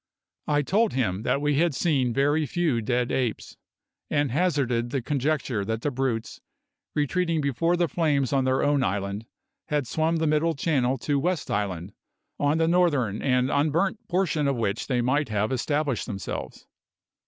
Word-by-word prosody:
I 145 0 +2
told 210 +8 +2
him 100 -7 0
that 140 +5 0
we 145 -1 +1
had 170 -4 +2
seen 135 -5 +1
very 145 +4 +1
few 155 -9 0
dead 120 +2 0
apes, 125 -4 -2 0.5
and 145 -3 +1
hazarded 135 -7 +1
the 135 +2 -1
conjecture 140 -5 -1
that 110 +3 -3
the 145 - 0
brutes, 125 -4 -2 0.5
retreating 165 +3 +1
before 155 +5 +1
the 175 -1 +2
flames 145 -6 +1
on 135 -1 +3
their 130 0 +1
own 145 -2 +2
island, 100 +2 -2 0.4
had 150 -4 0
swum 160 +6 0
the 160 0 0
Middle 155 +2 +2
Channel 135 -3 +1
to 140 +3 0
West 175 +1 -1
Island, 95 -3 -2 0.5
on 145 +2 +2
the 165 0 +2
northern 145 - +2
and 125 0 +2
unburnt 165 +8 0
portion 175 -5 +1
of 140 - +1
which 110 -1 -2
they 125 -2 +1
might 130 +2 +1
have 105 +1 0
established 135 0 -1
themselves. 100 -5 -6
140 Hz, 165 wpm, -26 LUFS, 120-155 Hz, 0.5 s, on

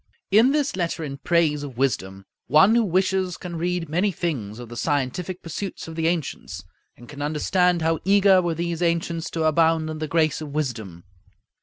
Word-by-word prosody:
In 220 +6 +6
this 285 -3 0
letter 170 -2 -2
in 140 -2 -6
praise 160 -3 +2
of 135 -4 -8
wisdom, 95 -8 -1 0.2
one 190 +8 +6
who 235 0 +4
wishes 190 -1 0
can 175 -1 -7
read 175 0 -2
many 180 +7 +1
things 135 - -3
of 120 -1 -8
the 120 - -10
scientific 150 +7 -2
pursuits 175 +3 -6
of 165 - -7
the 165 0 0
ancients, 165 -4 -3 0.3
and 120 - -14
can 145 +1 -9
understand 170 +4 +1
how 165 0 +1
eager 195 -1 +5
were 170 -2 -1
these 170 0 -3
ancients 170 -1 -1
to 165 - -2
abound 160 0 +2
in 155 - -6
the 155 - -3
grace 155 0 +1
of 155 - -6
wisdom. 110 - -4
165 Hz, 185 wpm, -23 LUFS, 145-180 Hz, 0.3 s, In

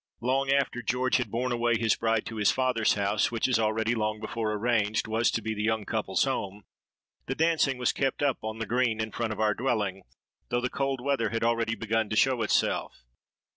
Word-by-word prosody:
Long 135 +2 +1
after 135 -3 +1
George 125 +2 +1
had 125 - -2
borne 125 +2 -2
away 120 -1 +1
his 110 -1 +2
bride 115 -1 0
to 115 - -6
his 105 -2 +3
father's 130 -4 +2
house, 100 +1 +1
which, 115 +1 0
as 125 -3 +2
already 110 +1 +1
long 110 -2 -1
before 110 0 -3
arranged, 110 -1 0
was 110 +2 +2
to 115 - -2
be 110 0 -2
the 105 - -4
young 110 -1 0
couple's - - 0
home, 100 +1 -3 0.6
the 135 - -2
dancing 160 -4 +2
was 125 -1 +1
kept 135 +1 -1
up 140 -3 +1
on 110 0 -4
the 115 - -3
green 115 0 0
in 110 0 -2
front 115 -2 -2
of 110 - -5
our 110 -1 +3
dwelling, 105 -6 -1 0.5
though 120 - +1
the 125 +1 -2
cold 135 -2 -1
weather 130 -5 0
had 115 0 -2
already 115 -1 +1
begun 115 -1 -1
to 110 - -2
show 130 +1 +3
itself. 105 - 0
115 Hz, 210 wpm, -28 LUFS, 110-125 Hz, 0.6 s, his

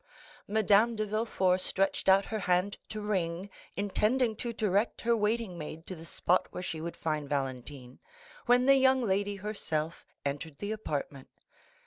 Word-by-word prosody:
Madame 215 +2 +4
de 215 0 -1
Villefort 200 -4 +1
stretched 195 +1 +1
out 195 +1 +6
her 220 - -3
hand 180 +1 +1
to 215 - -4
ring, 190 -2 -2 0.2
intending 220 +4 +1
to 235 +2 -3
direct 210 -1 0
her 235 0 +3
waiting 210 -4 -1
maid 155 +2 -7
to 185 - -6
the 165 0 -10
spot 180 +2 +1
where 180 - -6
she 160 -3 -4
would 170 +1 -5
find 155 -3 -2
Valentine, 130 -2 -4 0.5
when 245 +1 +5
the 275 0 +7
young 260 -1 +4
lady 200 -1 0
herself 170 -6 -3 0.2
entered 145 +1 -3
the 205 +1 -4
apartment. 145 -10 -4
195 Hz, 155 wpm, -30 LUFS, 165-215 Hz, 0.5 s, the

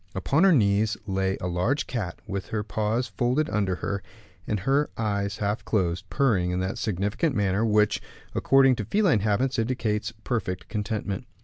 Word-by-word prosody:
Upon 135 - +2
her 195 - +6
knees 105 - +3
lay 95 -1 0
a - - -5
large 90 +12 0
cat, 105 -9 -4
with 100 -1 -4
her 105 -1 -2
paws 110 +4 -1
folded 130 +5 0
under 100 -3 +1
her, 100 +2 -3 0.5
and 105 -3 -1
her 135 +6 +2
eyes 100 -2 -1
half 105 +2 -1
closed, 95 -2 -1
purring 110 -11 +2
in 90 0 -1
that 95 +6 -2
significant 105 - -1
manner 100 0 +1
which, 105 -2 +3 0.3
according 135 -2 +4
to 110 - -3
feline 180 - +3
habits, 115 +6 +1
indicates 115 -3 -1
perfect 110 -7 -2
contentment. 105 -2 -3
105 Hz, 165 wpm, -26 LUFS, 100-125 Hz, 0.5 s, her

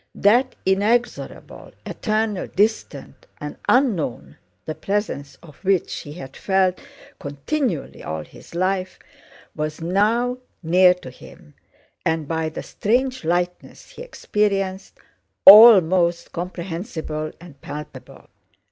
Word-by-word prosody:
That 245 +6 +3
inexorable, 210 +6 -1
eternal, 215 -2 -2
distant, 215 +3 -2
and - - -6
unknown 215 - 0 0.3
the 155 - -4
presence 195 -8 -3
of 150 -5 -15
which 190 -2 0
he 145 - -9
had 135 -5 -10
felt 190 -2 +1 0.4
continually 165 - -3
all 80 0 -5
his - - -15
life—was 185 -4 -5
now 220 +9 0 0.2
near 180 +2 +5
to 155 -8 -11
him 75 -10 -16 0.5
and, 160 -2 -1
by 160 0 -2
the 155 - -7
strange 255 +3 -1
lightness 175 +2 -3
he - - -11
experienced, 200 - -2 0.5
almost 185 -5 +8
comprehensible 170 -3 -5
and 165 -6 -15
palpable.... 150 +1 -10
185 Hz, 105 wpm, -21 LUFS, 160-210 Hz, 0.5 s, almost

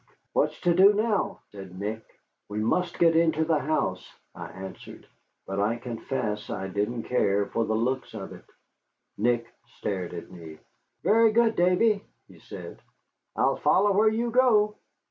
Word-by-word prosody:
"What's - - +1
to 175 -2 +3
do 195 +4 +7
now?" 205 -2 0
said 95 -3 -10
Nick. 110 +3 -4 0.5
"We 105 - -5
must 170 +12 0
get 165 -1 +4
into 160 -1 +3
the 160 -2 +2
house," 130 -11 -1 0.3
I - - -8
answered. 95 0 -10 0.4
But 95 +1 -4
I 105 +3 +1
confess 115 -3 -4
I 95 -1 -4
didn't 105 +4 -2
care 100 -5 +1
for 115 +2 -1
the 110 - -1
looks 125 +1 -2
of 95 -3 -7
it. - - -14 0.7
Nick 120 +2 +1 0.3
stared 95 -3 -3
at 85 - -8
me. 80 -3 -11 0.5
"Very 225 +1 +5
good, 230 0 +3
Davy," 195 +4 +3 0.2
he - - -17
said; - - -10 0.5
"I'll - - +2
follow 200 +2 +3
where 215 +2 +4
you 230 +2 -1
go." 220 -4 +3
125 Hz, 155 wpm, -26 LUFS, -, 0.7 s, do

